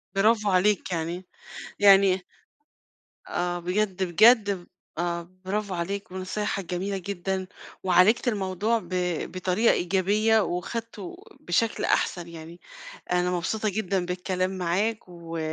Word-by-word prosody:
برافو 210 Hz, +1 st, +3 dB
عليك 190 Hz, +1 st, +2 dB
يعني، 170 Hz, +2 st, -3 dB, 0.5 s
يعني 195 Hz, -2 st, +6 dB, 1.0 s
آه، 175 Hz, 0 st, -2 dB
بجد، 190 Hz, +1 st, -1 dB
بجد 210 Hz, +4 st, +5 dB
ب 180 Hz, -3 st, -6 dB, 0.3 s
آه، 170 Hz, 0 st, -2 dB, 0.2 s
برافو 200 Hz, 0 st, -2 dB
عليك 195 Hz, +4 st, -4 dB
ونصايحك 190 Hz, +1 st, -3 dB
جميلة 190 Hz, +3 st, -3 dB
جدًا 190 Hz, 0 st, -3 dB, 0.4 s
وعالِجت 185 Hz, +7 st, +4 dB
الموضوع 210 Hz, +1 st, 0 dB
ب 175 Hz, -, -14 dB, 0.4 s
بطريقة 185 Hz, +5 st, +2 dB
إيجابية 200 Hz, +5 st, +2 dB
وأخدْته 210 Hz, +1 st, -4 dB, 0.2 s
بشكل 215 Hz, +6 st, 0 dB
أحسن 175 Hz, -2 st, 0 dB
يعني. 165 Hz, +1 st, -10 dB, 0.5 s
أنا 180 Hz, 0 st, +2 dB
مبسوطة 210 Hz, +5 st, -1 dB
جدًا 190 Hz, -3 st, -1 dB
بالكلام 185 Hz, +1 st, -2 dB
معاك 190 Hz, +5 st, -1 dB
و 170 Hz, -2 st, -8 dB
185 Hz, 110 wpm, -26 LUFS, 175-210 Hz, 1.0 s, يعني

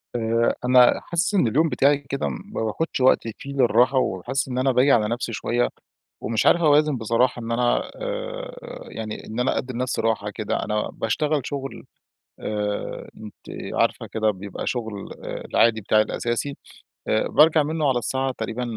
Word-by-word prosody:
آآ 115 Hz, 0 st, +1 dB
أنا 125 Hz, 0 st, +6 dB
حاسس 170 Hz, +5 st, -1 dB
إن 180 Hz, -, +4 dB
اليوم 155 Hz, +8 st, +2 dB
بتاعي 140 Hz, 0 st, +3 dB
كده 140 Hz, -1 st, -3 dB
ما 205 Hz, -, -5 dB
باخدش 135 Hz, +9 st, -2 dB
وقتي 115 Hz, -3 st, +3 dB
فيه 140 Hz, 0 st, -8 dB
للراحة، 125 Hz, 0 st, +3 dB
وحاسس 125 Hz, +2 st, -1 dB
إن 125 Hz, -1 st, -4 dB
أنا 130 Hz, +1 st, +2 dB
باجي 130 Hz, +3 st, +4 dB
على 110 Hz, -4 st, +4 dB
نفسي 120 Hz, 0 st, -3 dB
شوية 120 Hz, +3 st, 0 dB, 0.5 s
ومش 110 Hz, 0 st, 0 dB
عارف 170 Hz, -, +5 dB
أوازن 150 Hz, -2 st, +4 dB
بصراحة 120 Hz, +2 st, +1 dB
إن 115 Hz, 0 st, -5 dB
أنا 120 Hz, +1 st, +1 dB
آآ -, -, -5 dB, 0.4 s
يعني 110 Hz, -1 st, -6 dB
إن 110 Hz, +2 st, -5 dB
أنا 125 Hz, -, +1 dB
أدي 130 Hz, 0 st, -3 dB
لنفسي 125 Hz, +1 st, -1 dB
راحة 110 Hz, -2 st, 0 dB
كده، 105 Hz, 0 st, -3 dB
أنا 105 Hz, 0 st, -1 dB
باشتغل 145 Hz, +6 st, 0 dB
شغل 135 Hz, -2 st, -5 dB, 0.6 s
آآ 105 Hz, -1 st, -3 dB
أنتِ 105 Hz, -1 st, -10 dB, 0.4 s
عارفة -, -, +1 dB
كده 110 Hz, -1 st, +2 dB
بيبقى 100 Hz, 0 st, -6 dB
شغل 110 Hz, -5 st, -4 dB
العادي 115 Hz, -1 st, +1 dB
بتاعي 110 Hz, +1 st, +3 dB
الأساسي، 120 Hz, +6 st, -3 dB, 0.5 s
آآ 110 Hz, -, +1 dB
بارجع 155 Hz, 0 st, +5 dB
منه 155 Hz, -1 st, 0 dB
على 125 Hz, -2 st, +2 dB
الساعة 130 Hz, +2 st, -1 dB
تقريبًا 115 Hz, +2 st, -3 dB
125 Hz, 165 wpm, -23 LUFS, 110-140 Hz, 0.6 s, أنا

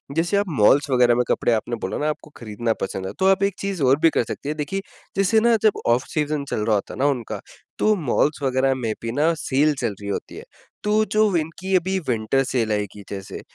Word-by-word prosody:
जैसे 170 Hz, +5 st, +1 dB
आप 200 Hz, -, +2 dB
मॉल्स 140 Hz, +8 st, +5 dB
वग़ैरह 125 Hz, -2 st, +4 dB
में 125 Hz, -, +2 dB
कपड़े -, -, +1 dB
आपने 115 Hz, +2 st, -1 dB
बोला 95 Hz, -, -3 dB
न -, -, -3 dB
आपको 150 Hz, 0 st, -3 dB
खरीदना 115 Hz, 0 st, -2 dB
पसंद 95 Hz, 0 st, -3 dB
है -, -, -4 dB
तो 190 Hz, -, +2 dB
आप 195 Hz, 0 st, +3 dB
एक 200 Hz, 0 st, +2 dB
चीज़ 195 Hz, -4 st, -3 dB
और 135 Hz, +2 st, +4 dB
भी 165 Hz, -, +5 dB
कर 155 Hz, -, +1 dB
सकते 140 Hz, +5 st, -6 dB
हैं, 150 Hz, -, -2 dB
देखिए 155 Hz, +6 st, -2 dB, 0.4 s
जैसे 195 Hz, +3 st, +4 dB
न 235 Hz, 0 st, +5 dB
जब 215 Hz, -, +3 dB
ऑफ 120 Hz, +2 st, +3 dB
सीजन 150 Hz, -1 st, -1 dB
चल 105 Hz, -, -1 dB
रहा 110 Hz, -, +3 dB
होता 100 Hz, -, -3 dB
है -, -, -9 dB
न -, -, +1 dB
उनका, 120 Hz, -5 st, -4 dB, 0.4 s
तो 215 Hz, 0 st, +3 dB
मॉल्स 150 Hz, -3 st, 0 dB
वग़ैरह 135 Hz, 0 st, +2 dB
में 115 Hz, -4 st, -2 dB
भी 115 Hz, -, -3 dB
न 160 Hz, +3 st, +3 dB
सेल 150 Hz, +2 st, +2 dB
चल 115 Hz, -4 st, -1 dB
रही 100 Hz, -, -5 dB
होती 100 Hz, -, -4 dB
है। -, -, -8 dB, 0.4 s
तो 210 Hz, +1 st, +3 dB
जो 215 Hz, -3 st, +2 dB
इनकी 170 Hz, +4 st, -2 dB
अभी 190 Hz, +2 st, +1 dB
विंटर 120 Hz, +3 st, +1 dB
सेल 120 Hz, -4 st, -1 dB
आएगी 105 Hz, -1 st, -3 dB
जैसे, 95 Hz, -1 st, -7 dB
140 Hz, 235 wpm, -22 LUFS, 115-185 Hz, 0.4 s, मॉल्स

